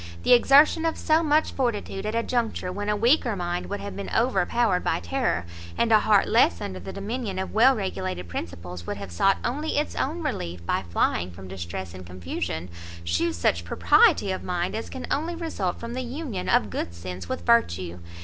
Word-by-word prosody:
The - - +6
exertion 285 +6 +6
of 325 -1 0
so 315 +1 +3
much 310 -1 +2
fortitude 210 -5 -2
at 215 - -2
a 230 - +1
juncture 230 -7 -1
when 205 +2 -3
a 210 - +2
weaker 235 +1 +3
mind 175 -1 -3
would 205 0 -4
have 200 - -6
been 200 - -5
overpowered 235 -4 +1
by - - 0
terror, 85 -1 -1 0.3
and - - +2
a - - +7
heart - - +4
less 85 - +4
under 95 +2 -5
the 95 +2 -7
dominion 205 0 -4
of 190 - -4
well 255 +5 +6
regulated 185 - -3
principles, 85 0 -7
would 100 - -3
have 100 -3 -8
sought 195 - +3
only 295 +6 -1
its 295 - -1
own 320 +5 -2
relief 85 - -4
by - - 0
flying 85 +1 +1
from 95 +2 -11
distress 90 -1 -6
and 95 -1 -10
confusion, 85 -1 -4 0.3
shews 85 -1 0
such 85 0 +1
propriety 85 - +4
of 185 - -3
mind 175 -1 -2
as 225 - -4
can 260 - -6
only 325 +4 -1
result 315 - -3
from 235 0 -6
the 255 - -2
union 250 - -4
of 105 - +3
good 85 0 -4
sense 90 0 -7
with 85 - -4
virtue. 90 -5 +2
185 Hz, 195 wpm, -25 LUFS, -, 0.3 s, a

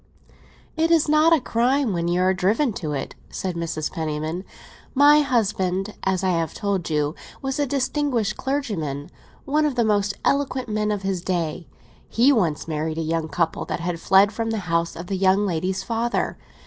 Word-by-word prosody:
"It 325 +1 +2
is 330 -3 +4
not 305 +2 +4
a 330 - +6
crime 245 0 +1
when 170 -1 -1
you 175 +1 +1
are 185 +1 +3
driven 210 +8 +1
to 155 -6 -4
it," 135 - -4 0.2
said 185 -2 -4
Mrs. 165 -2 -3
Penniman. 155 +2 -3 0.5
"My 290 +2 +7
husband, 205 -7 0
as 190 -1 0
I 185 - +2
have 165 -2 -1
told 200 -5 -2
you, 150 -1 0 0.3
was 270 +1 -2
a 290 - +1
distinguished 260 -5 0
clergyman; 185 - -3 0.3
one 300 +2 +2
of 295 -4 0
the 235 -2 +2
most 205 -1 +1
eloquent 265 -2 0
men 210 0 0
of 205 -2 -2
his 190 -2 -1
day. 170 -2 -2 0.4
He 255 +5 +4
once 170 - 0
married 155 0 -2
a - - -1
young 160 0 -1
couple 165 +2 -1
that - - -4
had 170 -1 -2
fled 195 +4 +5
from 225 +1 -3
the 225 - -1
house 170 0 0
of 170 - -7
the 190 +1 -2
young 190 +2 +3
lady's 185 +1 -1
father. 235 +1 -1
195 Hz, 185 wpm, -23 LUFS, 170-250 Hz, 0.5 s, My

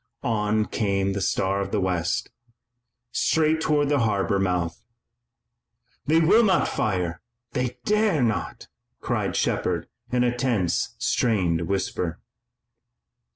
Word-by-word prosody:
On 110 -3 +1
came 100 -3 0
the 100 - -3
Star 95 +1 0
of 95 - -3
the 105 - 0
West, 90 -2 -1 0.8
straight 160 +4 +2
toward 150 -2 +2
the 145 -1 +2
harbor 100 -3 +1
mouth. 90 -3 -1 1.3
"They 160 +2 +4
will 190 +8 +5
not 190 -5 +3
fire! 90 -5 -1 0.3
They 125 0 -2
dare 210 - +2
not!" 110 -3 -2 0.3
cried - - -2
Shepard 85 -2 0 0.2
in 125 0 +2
a 120 0 +1
tense, 115 -4 0
strained 100 -8 +1
whisper. 90 -3 -2
105 Hz, 115 wpm, -25 LUFS, 95-130 Hz, 1.3 s, will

